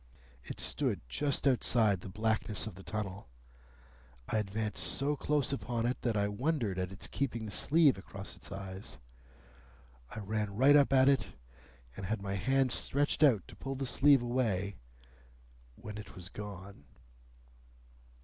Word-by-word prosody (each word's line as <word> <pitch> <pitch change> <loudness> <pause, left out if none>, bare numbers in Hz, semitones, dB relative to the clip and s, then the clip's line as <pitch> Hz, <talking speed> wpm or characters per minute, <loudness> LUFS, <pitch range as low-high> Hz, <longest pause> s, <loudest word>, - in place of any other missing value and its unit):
It - - -7
stood - - +1
just 140 - 0
outside 115 -6 +3
the 95 - -8
blackness 110 0 0
of 110 - -6
the 95 - -12
tunnel. 100 - -5 1.0
I 110 - 0
advanced 105 +1 -2
so 145 +2 +1
close 145 -1 0
upon 120 -3 -2
it 125 +2 -1
that 115 -4 0
I 100 0 +2
wondered 115 - -1
at 90 0 -2
its 95 - -7
keeping 120 -5 -2
the 105 - -5
sleeve 145 -2 +4
across 100 +1 -8
its - - -11
eyes. 95 -6 -7 1.1
I - - -10
ran 105 -1 -2
right 135 +6 +6
up 140 -2 +5
at 130 -1 +5
it, 135 -8 +3 0.7
and 95 - -6
had 110 +1 -1
my 100 0 -4
hand 130 +6 +2
stretched 145 +6 +1
out 125 - +4
to - - -12
pull 135 0 -5
the 135 +1 -3
sleeve 135 0 +5
away, 105 -7 -1 1.0
when 105 +7 -8
it 105 - -10
was 90 0 -8
gone." 100 -5 -9
110 Hz, 155 wpm, -32 LUFS, 100-135 Hz, 1.1 s, right